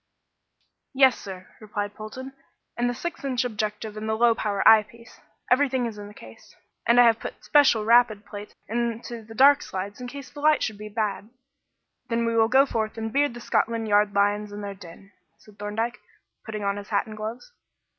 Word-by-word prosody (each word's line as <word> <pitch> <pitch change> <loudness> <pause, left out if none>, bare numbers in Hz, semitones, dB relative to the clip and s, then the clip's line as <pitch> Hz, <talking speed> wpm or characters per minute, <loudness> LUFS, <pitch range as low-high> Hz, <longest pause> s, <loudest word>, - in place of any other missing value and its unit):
"Yes, 265 -2 +5
sir," 185 -2 -9
replied 205 -1 -4
Polton, 255 +6 -8 0.4
"and 240 0 0
the - - -1
six 345 +4 -6
inch 255 -2 0
objective 215 -1 -4
and 215 +1 -5
the 220 - +1
low 235 +1 +4
power 205 -3 0
eye 220 -1 +9
piece. 230 +2 -17 0.3
Everything 260 -1 +3
is 220 -3 -6
in 205 - -8
the 205 - -12
case; 110 0 -15 0.3
and 235 +1 +5
I 245 - +8
have 230 -1 +4
put - - -8
'special 270 -7 +4
rapid' 230 -3 +4
plates 205 0 -9
into 235 0 -3
the 225 +1 -13
dark 280 +4 +6
slides 200 +5 -6
in 250 - -5
case 280 +1 -9
the 290 - -10
light 305 -1 +3
should 215 -2 -3
be 210 0 -7
bad." 210 -1 -3 0.8
"Then 235 0 0
we 230 0 0
will 225 -1 +4
go 265 +3 +5
forth 220 -4 -3
and 225 0 -4
beard 285 -3 +1
the 240 - -8
Scotland 230 -1 0
Yard 205 -1 +3
lions 205 +1 +1
in 205 0 -7
their 200 -1 -5
den," 195 +1 -14 0.3
said 210 -1 -20
Thorndyke, 220 +3 -3 0.5
putting 215 -2 -5
on 200 0 -1
his 205 0 -9
hat 200 -2 +1
and 215 - -9
gloves. 220 - -7
220 Hz, 200 wpm, -25 LUFS, 205-240 Hz, 0.8 s, eye